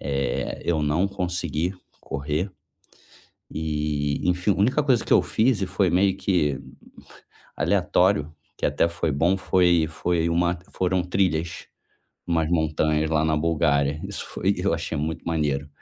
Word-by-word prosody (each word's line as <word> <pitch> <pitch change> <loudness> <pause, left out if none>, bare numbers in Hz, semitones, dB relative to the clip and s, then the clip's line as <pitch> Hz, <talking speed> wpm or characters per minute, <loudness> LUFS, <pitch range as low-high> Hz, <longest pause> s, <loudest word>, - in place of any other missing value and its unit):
eh 70 -3 -2
eu 80 -3 +1
não 80 +6 +1
consegui 90 -3 -2 0.3
correr. 75 +7 -3 1.0
E 75 -2 -2
enfim 90 +3 +1
a - - -2
única 125 +9 +2
coisa 130 -5 +2
que - - -1
eu - - +6
fiz 110 -3 +1
foi 95 -1 +1
meio 95 +2 +2
que 75 -10 0 1.0
aleatório, 75 +1 +2 0.2
que - - -5
até - - +2
foi 85 -1 -2
bom 85 +7 +2
foi 90 -3 +3
foi 85 +1 -1
uma 85 +1 +1 0.2
foram 95 0 0
trilhas 85 -3 -1 0.6
umas 80 -2 +1
montanhas 80 -1 +1
lá 80 -1 +2
na 80 -1 +2
Bulgária. 75 -3 +1
Isso - - -5
foi 100 +2 0
eu 95 +2 0
achei 80 -1 -3
muito 80 +2 -3
maneiro 75 -3 -1
85 Hz, 140 wpm, -24 LUFS, 75-90 Hz, 1.0 s, eu